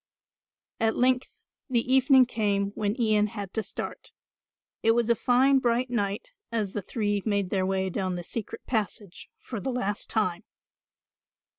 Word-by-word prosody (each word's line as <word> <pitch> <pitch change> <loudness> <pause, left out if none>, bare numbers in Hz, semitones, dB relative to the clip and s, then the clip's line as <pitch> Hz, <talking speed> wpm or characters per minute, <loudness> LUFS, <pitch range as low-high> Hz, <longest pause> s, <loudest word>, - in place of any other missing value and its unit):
At 225 0 +1
length 255 0 +2 0.4
the 245 0 +1
evening 265 0 +6
came 200 -4 0
when 210 +3 -2
Ian 215 -2 +3
had 200 -3 -7
to 220 - 0
start. - - -6 0.7
It 225 - +4
was 235 -1 +2
a - - +4
fine 260 +4 +4
bright 245 0 0
night 205 - -2 0.2
as 215 -4 -1
the 205 - -2
three 205 +1 -1
made 200 -4 0
their 190 -2 +1
way 190 0 0
down 185 -1 -2
the 175 - -5
secret 220 +5 -5
passage 205 -4 -3
for 230 - -6
the 200 - -3
last 205 -5 -2
time. 185 -6 0
215 Hz, 155 wpm, -27 LUFS, 200-245 Hz, 0.7 s, evening